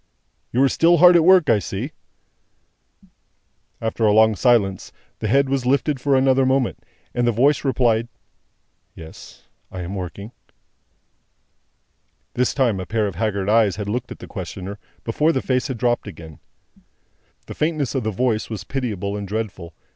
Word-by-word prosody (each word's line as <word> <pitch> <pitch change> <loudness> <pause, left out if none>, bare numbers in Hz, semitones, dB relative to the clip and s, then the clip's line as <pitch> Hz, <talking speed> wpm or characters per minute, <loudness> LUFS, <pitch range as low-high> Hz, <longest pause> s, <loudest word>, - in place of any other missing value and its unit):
"You 130 +3 +2
are - - +5
still 170 +5 +3
hard 180 +2 +7
at 170 - +5
work, 185 -1 +5
I 110 -3 +4
see?" 95 - -5 1.9
After 115 0 -3
a 105 - +5
long 110 +1 +4
silence, 100 -6 +1 0.3
the - - -3
head 140 0 +3
was 135 -2 -1
lifted 140 0 +1
for 140 0 +2
another 130 0 +3
moment, 130 -1 0 0.3
and 120 0 0
the - - +4
voice 135 +6 +2
replied, 120 -4 +1 0.9
"Yes 80 -1 -13 0.3
I 95 -1 -6
am 90 +2 -6
working." 100 +3 -7 2.0
This 125 +1 0
time, 120 -8 +1
a 95 - -6
pair 110 -1 0
of 100 - -3
haggard 100 +1 -2
eyes 110 -3 +3
had 105 0 -5
looked 120 +4 -3
at - - -7
the - - -10
questioner, 95 +1 -7 0.2
before 150 +8 +1
the 135 - 0
face 130 -1 0
had 130 -4 -4
dropped 120 -1 0
again. 80 -5 -11 1.1
The - - -8
faintness 155 -4 -1
of 135 - -1
the 110 - -1
voice 110 +1 -1
was 110 -3 -5
pitiable 105 -7 -3
and 100 -1 -5
dreadful. 95 -6 -5
115 Hz, 160 wpm, -21 LUFS, 100-135 Hz, 2.0 s, hard